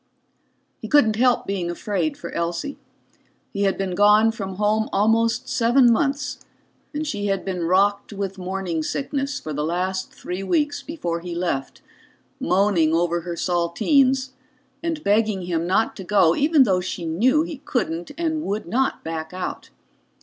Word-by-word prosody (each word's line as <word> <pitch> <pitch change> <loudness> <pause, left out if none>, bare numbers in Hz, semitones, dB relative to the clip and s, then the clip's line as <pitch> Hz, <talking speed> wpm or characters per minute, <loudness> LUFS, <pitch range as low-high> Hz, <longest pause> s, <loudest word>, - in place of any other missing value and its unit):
He - - -7
couldn't 225 -8 +4
help 250 0 +3
being 190 -3 -2
afraid 210 - -2
for - - -7
Elsie; 170 +12 -3 0.8
he 200 0 0
had 195 - +1
been 195 -2 -2
gone 210 +3 +5
from 195 -4 -6
home 215 +2 +1
almost 225 +3 +2
seven 240 +1 +4
months, 285 +4 -1 0.5
and 305 +1 -3
she 205 -8 -2
had 195 -1 -1
been 180 -3 -2
rocked 200 +5 +2
with 195 -1 -4
morning 185 -3 -3
sickness 275 - -2
for 155 - -6
the 150 +1 -2
last 185 +4 -2
three 180 +2 -6
weeks 295 - 0
before 175 - -4
he 175 0 -6
left, 170 -6 -3 0.6
moaning 180 -4 +2
over 170 0 +1
her 170 0 -5
saltines 260 - +2 0.5
and 325 -2 -3
begging 210 -2 +2
him 170 -1 -1
not 200 +5 +1
to 190 - -6
go 185 -4 +4
even 295 -1 +4
though 190 -6 +2
she 180 -1 -5
knew 245 - +2
he 325 -4 -7
couldn't 175 - -2
and 320 -2 -1
would 210 -4 -3
not 260 +8 0
back 160 0 -5
out. 185 0 -5
200 Hz, 155 wpm, -23 LUFS, 175-255 Hz, 0.8 s, gone